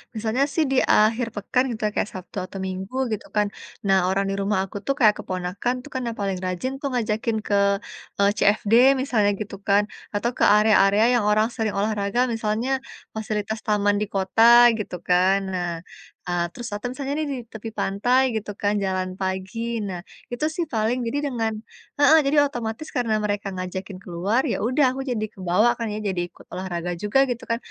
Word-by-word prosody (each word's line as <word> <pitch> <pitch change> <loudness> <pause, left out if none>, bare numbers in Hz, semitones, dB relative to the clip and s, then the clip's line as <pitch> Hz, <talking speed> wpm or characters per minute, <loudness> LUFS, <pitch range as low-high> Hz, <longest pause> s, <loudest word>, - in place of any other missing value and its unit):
misalnya 225 +5 0
sih, 320 - +3
di 270 - +2
akhir 225 +3 +3
pekan, 225 +5 +1
gitu 215 - -12
ya, 210 - +1
kayak - - 0
Sabtu 185 +2 -9
atau 195 - -8
Minggu, 190 +5 -5 0.2
gitu 210 - -4
kan. 210 0 +3 0.4
Nah, 195 -1 +4
orang 195 +1 +1
di - - -1
rumah 195 -1 +1
aku 195 - -8
tuh, 275 - +1
kayak 215 -3 +6
keponakan 185 +6 -2
itu - - -11
kan, 260 - -2
yang 230 - -3
paling 195 -2 -1
rajin, 185 +9 -2
tuh, 280 - -1
ngajakin 220 -1 0
ke, 205 - +2 0.7
eee, 200 - +5
CFD, 210 +1 +2 0.3
misalnya 215 -7 +2
gitu 210 -1 -5
kan. 200 +1 +4 0.3
Atau 235 +4 0
ke - - +1
area-area 210 -1 +5 0.2
yang - - -1
orang 215 +1 +3
sering 220 -3 -2
olahraga, 205 +2 -1
misalnya 225 +4 -1 0.3
fasilitas 220 0 -3
taman 205 -1 +2
di 210 - +1
kota, 230 +5 +6
gitu 195 - -4
kan. 185 +2 +3
Nah, 175 -1 -2 0.5
eee, 175 -1 0
terus 240 -1 -6
atau 210 +4 -3
misalnya 275 +2 -4
nih, 310 - -1
di - - -4
tepi 220 +1 -7
pantai 245 +7 +2
gitu 210 -1 -3
kan, 205 0 +2
jalan 185 -1 -1
pagi. 190 +3 -3 0.2
Nah, 185 -3 -5 0.3
itu 275 +6 -1
sih, 345 - -1
paling. 225 +3 +1
Jadi 285 +5 -1
dengan 225 -3 -1 0.5
heeh, 295 +2 +7
jadi 285 +2 +2
otomatis, 240 +1 -4
karena 230 -3 +1
mereka 205 -1 -2
ngajakin 185 +1 -5
keluar, 190 +7 0
ya - - -1
udah, 260 +5 +3
aku 270 - -3
jadi 215 -2 -1
kebawa, 190 +4 +2
kan 230 -1 -3
ya, - - -4
jadi 185 -2 -1
ikut - - -18
olahraga 180 -1 -4
juga, 210 +6 +2
gitu 235 -1 -3
kan, 230 - +1
210 Hz, 190 wpm, -23 LUFS, 195-235 Hz, 0.7 s, heeh